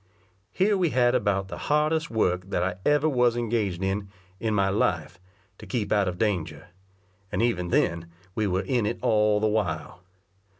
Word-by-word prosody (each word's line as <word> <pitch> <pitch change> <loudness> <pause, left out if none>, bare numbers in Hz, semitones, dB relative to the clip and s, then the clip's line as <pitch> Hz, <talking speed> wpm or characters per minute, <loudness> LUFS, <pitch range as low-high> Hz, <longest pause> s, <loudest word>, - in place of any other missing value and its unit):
Here 200 - +2
we 175 -3 +2
had 125 -3 +3
about 100 -2 +1
the 85 -2 -7
hardest 155 +2 +2
work 90 -4 0
that - - 0
I 90 0 -2
ever 150 +1 +3
was 125 -4 +2
engaged 105 -6 -1
in, 100 +1 -2 0.3
in 110 -2 -1
my 100 -1 +2
life, 90 -3 -1 0.4
to - - -11
keep 110 -5 -2
out 100 -2 +3
of 90 -1 -3
danger; 85 -9 -2 0.6
and - - -2
even 90 -7 0
then 85 -1 +1 0.3
we 110 +1 0
were 95 +1 0
in 115 +1 0
it 115 - -2
all 105 -1 +3
the 110 - 0
while. 90 -6 -2
105 Hz, 175 wpm, -26 LUFS, 90-120 Hz, 0.6 s, had